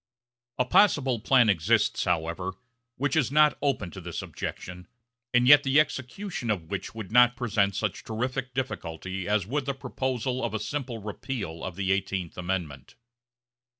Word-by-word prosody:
A 125 Hz, -, +2 dB
possible 135 Hz, -, +3 dB
plan 120 Hz, +1 st, +4 dB
exists, 90 Hz, -7 st, +2 dB
however, 90 Hz, +2 st, -1 dB, 0.4 s
which 140 Hz, 0 st, -1 dB
is -, -, +2 dB
not 150 Hz, 0 st, +5 dB
open 135 Hz, -11 st, -1 dB
to 95 Hz, -, -9 dB
this 85 Hz, -1 st, -5 dB
objection, 90 Hz, 0 st, -7 dB, 0.4 s
and 125 Hz, 0 st, +3 dB
yet 145 Hz, +1 st, +9 dB
the 140 Hz, +1 st, +3 dB
execution 140 Hz, -, -2 dB
of 90 Hz, -6 st, -2 dB
which 100 Hz, +3 st, -4 dB
would 110 Hz, -4 st, -7 dB
not 120 Hz, +1 st, +6 dB
present 105 Hz, -5 st, 0 dB
such 105 Hz, -3 st, -2 dB
terrific 125 Hz, +3 st, -3 dB
difficulty 95 Hz, -7 st, -4 dB
as 105 Hz, -3 st, +1 dB
would 135 Hz, +5 st, -2 dB
the 140 Hz, -, -1 dB
proposal 130 Hz, -1 st, -2 dB
of 110 Hz, -, -2 dB
a -, -, -1 dB
simple 130 Hz, 0 st, -4 dB
repeal 105 Hz, -4 st, -5 dB
of 95 Hz, -, -5 dB
the 95 Hz, 0 st, -1 dB
Eighteenth 95 Hz, -3 st, -2 dB
Amendment. 90 Hz, -6 st, -4 dB
110 Hz, 155 wpm, -27 LUFS, 95-130 Hz, 0.4 s, yet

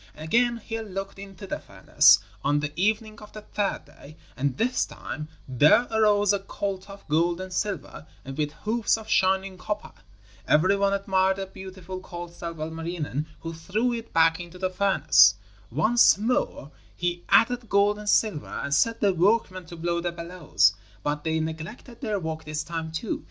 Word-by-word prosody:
Again 235 Hz, +10 st, +1 dB
he 225 Hz, 0 st, -5 dB
looked 195 Hz, -2 st, -6 dB
into 195 Hz, -1 st, -9 dB
the -, -, -4 dB
furnace, -, -, +5 dB, 0.3 s
on 145 Hz, +1 st, +2 dB
the 150 Hz, 0 st, -3 dB
evening 215 Hz, +4 st, 0 dB
of 210 Hz, -, -13 dB
the 215 Hz, -, -9 dB
third 205 Hz, -1 st, -2 dB
day, 155 Hz, +3 st, -15 dB, 0.2 s
and 135 Hz, -1 st, -1 dB
this 250 Hz, +2 st, +1 dB
time 150 Hz, -, -7 dB, 0.2 s
there 145 Hz, -, +5 dB
arose 205 Hz, -2 st, +3 dB
a 200 Hz, -, +1 dB
colt 195 Hz, 0 st, -5 dB
of 200 Hz, 0 st, -12 dB
gold 170 Hz, +3 st, +1 dB
and 185 Hz, 0 st, -6 dB
silver 190 Hz, -5 st, -4 dB, 0.2 s
and 135 Hz, 0 st, -7 dB
with 150 Hz, 0 st, -1 dB
hoofs 220 Hz, +8 st, 0 dB
of 220 Hz, -1 st, -10 dB
shining 190 Hz, -1 st, +1 dB
copper. 210 Hz, +3 st, -4 dB, 0.6 s
Every 185 Hz, +6 st, +4 dB
one 200 Hz, 0 st, +2 dB
admired 190 Hz, -1 st, +2 dB
the 195 Hz, -, -3 dB
beautiful 190 Hz, -1 st, -9 dB
colt 175 Hz, -2 st, -8 dB
save 170 Hz, -2 st, -7 dB
Ilmarinen, 160 Hz, -2 st, -4 dB
who 165 Hz, 0 st, -5 dB
threw 210 Hz, +9 st, -1 dB
it 230 Hz, -1 st, -6 dB
back 165 Hz, 0 st, +4 dB
into 175 Hz, +1 st, -9 dB
the 185 Hz, 0 st, -2 dB
furnace. 155 Hz, -, +5 dB, 0.3 s
Once 215 Hz, -, +4 dB
more 215 Hz, -, -1 dB, 0.2 s
he 175 Hz, 0 st, -2 dB
added 240 Hz, +1 st, +3 dB
gold 205 Hz, +1 st, +3 dB
and 210 Hz, 0 st, -4 dB
silver 205 Hz, -11 st, +2 dB
and 140 Hz, -, -4 dB
set 230 Hz, +9 st, +2 dB
the 200 Hz, -2 st, +3 dB
workmen 185 Hz, -1 st, +1 dB
to 170 Hz, -, -9 dB
blow 170 Hz, +1 st, -1 dB
the 175 Hz, 0 st, -2 dB
bellows, 170 Hz, -, +1 dB, 0.3 s
but 150 Hz, 0 st, -2 dB
they 160 Hz, 0 st, 0 dB
neglected 160 Hz, -, -6 dB
their 215 Hz, -5 st, -1 dB
work 160 Hz, -2 st, -5 dB
this 155 Hz, 0 st, -3 dB
time 165 Hz, -1 st, -5 dB
too. 165 Hz, +7 st, -3 dB
185 Hz, 175 wpm, -26 LUFS, 160-205 Hz, 0.6 s, furnace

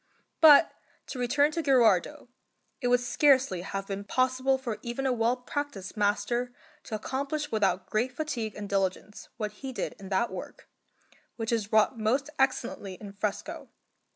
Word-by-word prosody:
But 315 Hz, 0 st, +8 dB, 0.3 s
to 260 Hz, -, -7 dB
return 285 Hz, +5 st, +2 dB
to 330 Hz, -, -2 dB
Gherardo; 245 Hz, -, +3 dB, 0.5 s
it 250 Hz, -, 0 dB
would 245 Hz, 0 st, +4 dB
scarcely 260 Hz, -, +3 dB
have 195 Hz, +2 st, -4 dB
been 195 Hz, 0 st, -5 dB
possible 255 Hz, +4 st, +1 dB
for 235 Hz, -5 st, -5 dB
even 240 Hz, +3 st, -4 dB
a 260 Hz, -, +2 dB
well 235 Hz, +1 st, +1 dB
practised 250 Hz, -6 st, -5 dB
master 210 Hz, +4 st, 0 dB, 0.3 s
to 220 Hz, -, -4 dB
accomplish 280 Hz, +6 st, -3 dB
without 195 Hz, -4 st, +1 dB
great 240 Hz, +4 st, 0 dB
fatigue 250 Hz, -6 st, -4 dB
and 205 Hz, -1 st, -6 dB
diligence 195 Hz, +1 st, -2 dB
what 210 Hz, -2 st, -3 dB
he 270 Hz, -1 st, -4 dB
did 250 Hz, -, -3 dB
in 195 Hz, -1 st, -9 dB
that 200 Hz, +5 st, +1 dB
work, -, -, -8 dB, 0.7 s
which 225 Hz, -1 st, -3 dB
is 220 Hz, -3 st, -1 dB
wrought 220 Hz, +2 st, +3 dB
most 265 Hz, +7 st, 0 dB
excellently 245 Hz, -7 st, -1 dB
in 200 Hz, +1 st, -10 dB
fresco. 205 Hz, 0 st, -4 dB
235 Hz, 155 wpm, -28 LUFS, 205-265 Hz, 0.7 s, But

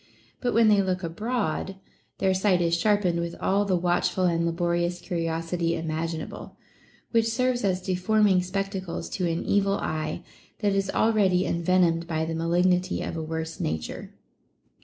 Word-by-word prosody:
But 245 Hz, -3 st, -1 dB
when 230 Hz, -1 st, +5 dB
they 205 Hz, -2 st, +5 dB
look 190 Hz, -1 st, -1 dB
abroad, 195 Hz, +1 st, -2 dB, 0.4 s
their 190 Hz, -1 st, +2 dB
sight 185 Hz, -1 st, +2 dB
is 170 Hz, -1 st, +1 dB
sharpened 185 Hz, -2 st, +2 dB
with 170 Hz, 0 st, -3 dB
all 200 Hz, +2 st, +1 dB
the 190 Hz, -2 st, +1 dB
watchful 175 Hz, +2 st, +1 dB
and 170 Hz, -1 st, +2 dB
laborious 175 Hz, +1 st, 0 dB
curiosity 165 Hz, 0 st, -2 dB
imaginable, 160 Hz, 0 st, -4 dB, 0.5 s
which 230 Hz, -1 st, +3 dB
serves 250 Hz, +1 st, 0 dB
as 185 Hz, -2 st, 0 dB
deforming 190 Hz, +1 st, +2 dB
spectacles 190 Hz, -1 st, -4 dB
to 180 Hz, -2 st, -1 dB
an 165 Hz, 0 st, -2 dB
evil 200 Hz, 0 st, +2 dB
eye, 155 Hz, +2 st, -3 dB, 0.4 s
that 205 Hz, -1 st, +2 dB
is 195 Hz, 0 st, 0 dB
already 195 Hz, -5 st, +2 dB
envenomed 170 Hz, -1 st, +2 dB
by 160 Hz, -1 st, -1 dB
the 165 Hz, -, -3 dB
malignity 180 Hz, +3 st, +1 dB
of -, -, -4 dB
a 165 Hz, -, -3 dB
worse 160 Hz, +1 st, -4 dB
nature. 80 Hz, 0 st, -4 dB
180 Hz, 150 wpm, -26 LUFS, 165-195 Hz, 0.5 s, when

